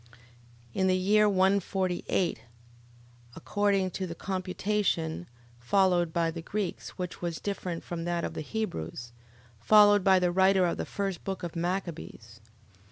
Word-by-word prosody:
In 190 -1 +1
the 185 0 +3
year 210 +3 +4
148... 190 -2 +1
Viz., - - -22 0.9
according 195 +2 0
to 185 +1 -4
the 170 - -6
computation 185 - -2 0.3
followed 175 +5 +2
by 165 0 0
the 165 0 -6
Greeks; 200 +2 -4
which 180 -1 -5
was 170 -2 -3
different 185 -4 -4
from 170 -1 -5
that 175 -1 -1
of - - -3
the - - -4
Hebrews, 120 - -4 0.5
followed 205 - +6
by 190 -1 +5
the 180 -1 +2
writer 190 +1 +4
of 170 - -1
the - - -4
first 195 -4 -3
book 190 -1 -4
of 175 -1 -5
Machabees. 170 - -4
185 Hz, 145 wpm, -28 LUFS, 170-195 Hz, 0.9 s, followed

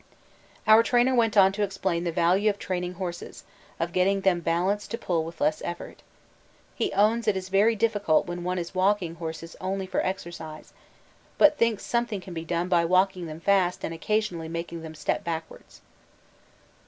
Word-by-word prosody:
Our 220 +1 +7
trainer 245 +2 +3
went 225 -3 +2
on 190 -1 +7
to 205 +2 -4
explain 190 -3 -1
the 170 - 0
value 185 +6 +3
of 205 - -2
training 180 -2 -3
horses, 175 -1 -6 0.4
of 170 +1 -2
getting 195 +1 +2
them 190 -3 +2
'balanced' 180 +5 0
to 230 - -3
pull 170 -6 -1
with 165 +1 -9
less 150 +1 +1
effort. 175 0 -6 0.7
He - - -1
owns 220 +4 +2
it 205 -2 +3
is 185 0 -6
very 205 +4 +3
difficult 205 -7 +2
when 175 0 -5
one 180 +1 -2
is 175 0 -4
walking 185 -2 +1
horses 165 0 -6
only 190 +1 -2
for 185 - -1
exercise, 170 -4 -6 0.6
but 300 0 +5
thinks 230 -3 +1
something 235 -4 -1
can 180 -1 -10
be 165 -1 -5
done 170 +1 -1
by 175 -2 +3
walking 185 0 +2
them 155 +1 -8
fast 185 -1 +2
and 165 - -4
occasionally 175 -2 -2
making 170 0 -5
them 160 -1 -9
step 150 - -2
backwards. 165 -1 -7
185 Hz, 180 wpm, -26 LUFS, 170-205 Hz, 0.7 s, Our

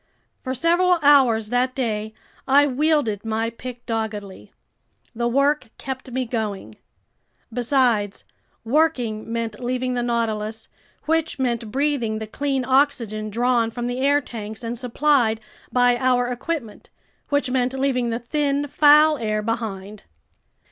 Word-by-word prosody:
For 260 0 -3
several 350 +5 +3
hours 250 -7 +5
that 250 +2 0
day, 220 -4 -2 0.3
I 280 +2 +6
wielded 285 -6 +1
my 225 +1 -1
pick 245 +1 -9
doggedly. 210 - -4 0.6
The 235 +1 -1
work 275 +1 +1
kept 260 0 -6
me 255 +1 -2
going. 210 - -4 0.8
Besides, 240 -5 +1 0.4
working 240 -5 0
meant 230 -2 -3
leaving 255 +1 -2
the 245 - -1
Nautilus, 220 -2 -2 0.4
which 320 0 0
meant 235 -4 -1
breathing 265 -5 0
the 220 - -4
clean 270 +3 -2
oxygen 240 -6 +1
drawn 235 +1 +1
from 240 +1 -5
the 245 +1 -3
air 285 +2 +3
tanks 220 -2 -8
and 230 +1 -3
supplied 250 -2 +1 0.3
by 245 -1 +3
our 245 -1 +2
equipment, 250 -2 -5 0.4
which 285 -2 0
meant 255 0 +1
leaving 260 -3 0
the 230 - -1
thin, 285 +3 -1
foul 300 +1 +5
air 215 -2 -1
behind. 215 -3 -4
245 Hz, 130 wpm, -22 LUFS, 225-275 Hz, 0.8 s, I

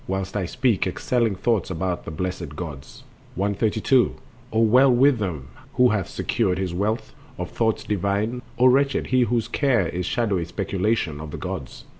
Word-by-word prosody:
—whilst 95 +1 -3
I 95 -4 -1
speak 115 -1 +1
Excelling 115 +3 0
thoughts 110 0 0
about 90 0 -3
the - - -5
blessed 85 -2 -4
gods. 75 -5 -8 0.3
132. 110 +6 +2 0.4
O 110 - +1
well 125 +5 +5
with 130 +1 +4
him 80 -10 -4 0.3
who 125 0 +5
hath 100 -6 -1
secured 95 -6 0
his 95 -2 -2
wealth 110 +4 -2 0.2
Of 90 0 -5
thoughts 110 -2 0
divine, 105 +4 -1 0.2
O 125 - +4
wretched 135 +2 +3
he 130 - +5
whose 120 -1 +1
care 125 - +1
Is 90 +1 -3
shadowy 105 -8 0
speculation 95 -3 -1
on 80 - -7
the - - -6
gods! - - -6
100 Hz, 165 wpm, -23 LUFS, 90-120 Hz, 0.4 s, well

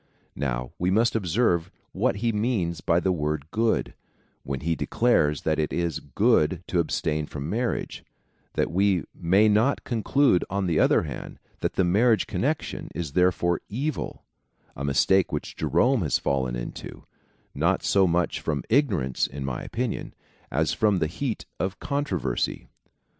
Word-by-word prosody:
Now 60 -3 -2
we 90 - +1
must 115 +5 +2
observe 90 -3 +1 0.2
what - - 0
he 115 - +3
means 105 -6 -1
by 85 +1 +2
the 95 +1 +1
word 75 -3 -1
good, 115 +1 0 0.5
when 70 0 -4
he 85 +2 0
declares 80 -12 +1
that 80 0 +1
it 75 - 0
is 85 -3 -1
good 75 +5 +2
to 90 - +1
abstain 75 -2 -1
from 70 +2 -5
marriage, 120 +3 -2 0.5
that - - 0
we 95 -1 +2
may 95 +6 +3
not 110 +6 +2
conclude, 120 -3 +2
on 100 +1 -1
the 85 -3 +1
other - - +4
hand, 70 -4 -7 0.2
that - - -1
the 95 - +2
marriage 110 +6 +3
connection 145 +4 -2
is 80 -5 -3
therefore 90 0 +2
evil 135 +7 -3 0.3
— - - -38
a 70 - -6
mistake 90 +7 +3
which - - -4
Jerome 130 -2 +2
has 75 - +1
fallen 65 -3 -1
into, - - -7 0.5
not - - +1
so 95 -1 +4
much 85 0 0
from 75 -3 -2
ignorance, 100 - +2
in 70 0 -6
my 65 -2 -3
opinion, 120 -2 -4 0.3
as 80 +4 +1
from 105 +2 +2
the 85 - +1
heat 110 - -3
of 95 +2 -2
con 145 0 -1
troversy. 70 - -2
90 Hz, 160 wpm, -26 LUFS, 75-110 Hz, 0.5 s, other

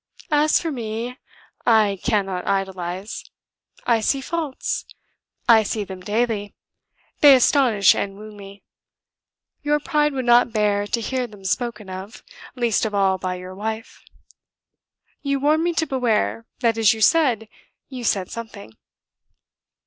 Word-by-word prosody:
as 300 +1 +4
for 330 - -3
me, 235 -1 -4 0.5
I 215 -4 +3
cannot 195 -5 -1
idolize. 190 0 -3 0.6
I 235 -2 +3
see 270 +5 +1
faults: 300 0 -3 0.6
I 225 -2 +7
see 215 0 -2
them 190 -1 -8
daily. 210 0 -1 0.6
They 285 -2 +9
astonish 250 -5 +4
and 195 -1 -3
wound 215 0 -11
me. 200 0 -12 1.0
Your 295 0 +1
pride 300 -1 +1
would 260 -2 -3
not 240 0 +5
bear 205 -1 +1
to 230 - -1
hear 255 +2 -2
them 205 -3 -15
spoken 220 0 -2
of, 190 +3 -8 0.3
least 240 -4 +1
of 215 -2 -2
all 190 -1 +2
by 185 0 -3
your 180 +1 -8
wife. 220 +3 -6 1.2
You 280 -1 -1
warned 305 +3 +2
me 345 - +1
to 325 -1 0
beware 235 -4 0
that 230 -2 +2
is, 220 -1 +5
you 220 - -7
said, 245 -6 +3 0.4
you 255 -3 -7
said 195 -5 0
something." 220 - -8
225 Hz, 140 wpm, -22 LUFS, 200-260 Hz, 1.2 s, They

